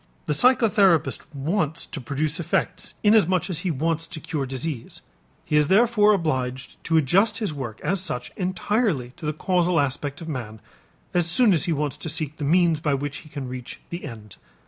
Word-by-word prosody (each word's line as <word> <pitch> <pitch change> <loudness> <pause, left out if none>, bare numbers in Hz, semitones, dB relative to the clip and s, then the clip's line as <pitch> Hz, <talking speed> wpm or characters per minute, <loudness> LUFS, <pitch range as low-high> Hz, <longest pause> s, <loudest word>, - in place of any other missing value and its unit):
The 150 - 0
psychotherapist 200 - +4
wants 160 +2 -1
to 145 - -7
produce 150 +6 -2
effects 170 - -2
inasmuch 195 -4 +3
as 165 - -2
he 185 +1 -2
wants 165 +2 -1
to - - -6
cure 145 -2 -3
disease. 130 0 -5 0.4
He 150 - -1
is 150 -1 +4
therefore 215 +1 +5
obliged 130 -7 -2
to 165 - +2
adjust 195 - +3
his 210 -8 -2
work 125 -6 -6
as 195 -1 0
such 155 -9 -4
entirely 185 - 0
to 155 - -6
the - - +1
causal 180 +1 +1
aspect 140 +2 -2
of 165 - -8
man, 120 -8 -5 0.5
as 175 -1 +2
soon 215 +3 +5
as 160 - +1
he 170 - 0
wants 150 -2 -1
to 160 - -5
seek 155 -1 -3
the - - -5
means 165 +1 +3
by 150 -2 +1
which 145 +1 -4
he 155 - -13
can 140 -3 -6
reach 125 -1 -7
the 170 +1 -5
end. 110 -7 -9
155 Hz, 190 wpm, -24 LUFS, 140-180 Hz, 0.5 s, therefore